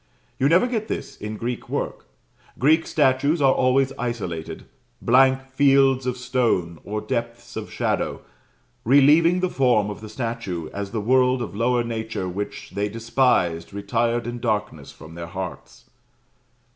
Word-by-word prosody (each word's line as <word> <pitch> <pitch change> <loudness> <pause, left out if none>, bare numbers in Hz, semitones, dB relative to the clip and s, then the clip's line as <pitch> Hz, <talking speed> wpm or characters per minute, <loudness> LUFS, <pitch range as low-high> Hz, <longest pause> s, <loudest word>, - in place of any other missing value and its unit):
You 135 +2 +3
never 180 +7 +5
get 225 -3 -2
this - - -5
in 105 +1 -6
Greek 120 +2 -4
work. - - -4 0.5
Greek 155 +5 +3
statues 145 +2 +2
are 135 -2 +4
always 135 +1 +2
isolated; 100 -10 -4 0.3
blank 130 +2 +4
fields 135 -1 +3
of 125 0 -1
stone, 120 -10 0
or 105 +1 -4
depths 115 -2 -4
of - - -6
shadow, - - -1 0.6
relieving 150 +8 +5
the 185 - +2
form 120 -6 +2
of 105 - -9
the 110 - -9
statue, 110 -8 -4
as 100 -1 -4
the 110 +1 -3
world 125 +3 +3
of - - -7
lower 120 +2 +1
nature 110 -4 -4
which 100 +3 -6
they 105 +1 -2
despised 110 -7 0
retired 115 +4 0
in 120 0 -5
darkness 105 - -2
from 80 - -13
their 85 0 -7
hearts. 95 +1 -8
120 Hz, 145 wpm, -23 LUFS, 105-135 Hz, 0.6 s, never